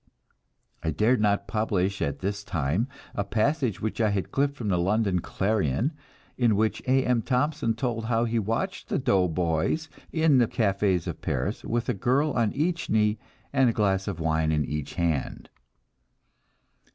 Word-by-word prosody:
I - - -1
dared 105 - +2
not 100 -1 +1
publish 100 -4 0
at 70 - -2
this 100 +1 -2
time 85 - -1 0.3
a 100 - -1
passage 115 - 0
which 110 +1 -2
I 110 - +3
had 100 -2 -2
clipped 140 +1 +1
from 115 -7 -4
the 90 -2 +2
London 100 0 +1
Clarion, 100 - 0 0.5
in 120 -4 +4
which 110 +2 0
A. 130 +1 +3
M. 125 -2 +2
Thompson 125 -2 0
told 115 -2 -2
how 115 0 +1
he 115 0 0
watched 115 - -2
the - - 0
"doughboys" 90 - +1 0.2
in 160 -5 +4
the 120 - +4
cafés 100 -5 +1
of - - -5
Paris, - - -2
with 120 +1 -1
a - - +1
girl 135 +9 +1
on 115 -5 +1
each 170 +4 -1
knee, 105 0 +2 0.3
and 135 -3 +4
a - - 0
glass 95 -3 +1
of 95 -5 -3
wine 80 -1 +1
in 75 -2 +1
each 75 +1 -4
hand. 85 -6 -2
110 Hz, 165 wpm, -26 LUFS, 95-125 Hz, 0.5 s, in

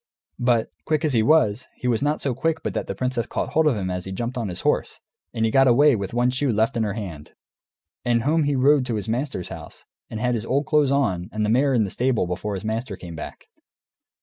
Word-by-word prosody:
But, 120 -2 +1 0.2
quick 155 0 +1
as 150 - +1
he 115 - +4
was, 120 -4 +3
he 125 - -4
was 115 -3 +1
not 150 +2 0
so 135 - 0
quick 160 +6 -1
but - - -2
that - - -3
the - - -4
princess 125 -2 -2
caught - - -3
hold 160 0 +2
of 145 - +3
him 95 -3 -2
as 90 0 -4
he 95 - -6
jumped 120 +6 -3
on 120 -4 -2
his 90 -2 -5
horse, - - 0 0.3
and 115 - 0
he 110 - +1
got 135 +1 +5
away 140 +3 +5
with 100 -3 -4
one 120 +1 +2
shoe 135 +1 0
left 110 +4 +1
in 115 - 0
her 105 -2 -1
hand. 85 -9 -7 0.7
And 120 -1 +1
home 155 +2 +2
he 145 -1 +1
rode, 135 +1 +4
to 120 - -1
his 105 0 -3
master's 120 - -2
house, - - -10 0.2
and 110 - -5
had 125 +1 +1
his 115 -3 -2
old 140 +5 0
clothes 150 -2 +3
on 100 -11 0
and 105 0 -1
the 105 - +1
mare 135 +3 +3
in 115 - +3
the 100 - -3
stable 125 -5 +1
before 90 +3 -3
his 95 +2 -6
master 110 0 -3
came 85 -2 -9
back. 80 - -8
120 Hz, 255 wpm, -23 LUFS, 105-135 Hz, 0.7 s, got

